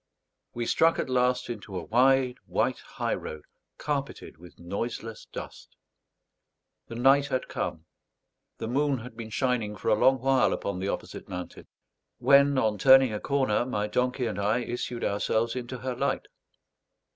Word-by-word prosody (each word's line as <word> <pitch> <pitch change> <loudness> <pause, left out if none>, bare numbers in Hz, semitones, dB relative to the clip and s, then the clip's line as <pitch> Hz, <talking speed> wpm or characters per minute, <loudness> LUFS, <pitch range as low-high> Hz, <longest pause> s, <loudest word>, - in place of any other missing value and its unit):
We 120 0 -2
struck 165 +7 +3
at 130 - -2
last 125 0 +1
into 105 -5 -6
a 90 - -4
wide 125 +5 +3
white - - 0
high - - -3
road 80 -1 -6 0.3
carpeted 140 - -4
with 90 0 -15
noiseless 110 +5 -5
dust. - - -9 1.1
The 115 - -8
night 135 +4 +4
had 130 -3 -2
come; 80 0 -4 0.7
the - - -4
moon 140 +3 +1
had 120 0 -10
been 115 -1 -7
shining 110 -1 -1
for 105 - -3
a - - +5
long 130 +5 +4
while 135 +1 +3
upon 100 -2 -3
the 95 - -2
opposite - - -5
mountain; 90 -1 -7 0.5
when 140 0 +5
on 110 -5 +1
turning 130 -3 +7
a 105 - -2
corner 135 -6 +1
my 105 -5 -2
donkey 125 +3 0
and 105 -3 -3
I 105 +4 +1
issued 120 0 -4
ourselves 110 +3 0
into 125 0 -5
her 130 +1 -4
light. - - -1
120 Hz, 155 wpm, -27 LUFS, 105-130 Hz, 1.1 s, turning